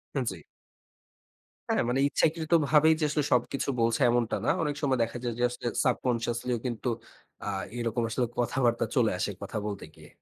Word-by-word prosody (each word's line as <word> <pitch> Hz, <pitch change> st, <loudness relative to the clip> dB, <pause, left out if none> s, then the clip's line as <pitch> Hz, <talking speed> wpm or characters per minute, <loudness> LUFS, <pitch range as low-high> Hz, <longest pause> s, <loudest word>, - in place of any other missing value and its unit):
হা 135 Hz, -, +1 dB
জি। 95 Hz, -, -6 dB, 1.3 s
হ্যাঁ, -, -, +2 dB
মানে 125 Hz, +2 st, +1 dB
ইচ্ছাকৃতভাবেই 160 Hz, 0 st, +3 dB
যে 155 Hz, -, -1 dB
আসলে 150 Hz, 0 st, 0 dB
সবকিছু 125 Hz, +3 st, 0 dB
বলছে 115 Hz, +3 st, +2 dB
এমনটা 120 Hz, -1 st, +1 dB
না। -, -, +2 dB
অনেক 150 Hz, -2 st, -1 dB
সময় 135 Hz, -3 st, +2 dB
দেখা 115 Hz, +1 st, -4 dB
যায় 120 Hz, -1 st, -1 dB
যে -, -, +1 dB
আসলে 120 Hz, 0 st, -5 dB, 0.2 s
সাবকন্সিয়াসলিও 120 Hz, -1 st, 0 dB
কিন্তু 120 Hz, 0 st, -3 dB, 0.6 s
আ -, -, -5 dB, 0.3 s
এরকম 120 Hz, 0 st, -1 dB
আসলে 125 Hz, +2 st, 0 dB
কথাবার্তা 120 Hz, -1 st, +1 dB
চলে 120 Hz, -4 st, +3 dB
আসে 100 Hz, +2 st, -1 dB
কথা 100 Hz, +2 st, -5 dB
বলতে 100 Hz, -2 st, -4 dB
গিয়ে। -, -, -15 dB
120 Hz, 165 wpm, -28 LUFS, 115-140 Hz, 1.3 s, ইচ্ছাকৃতভাবেই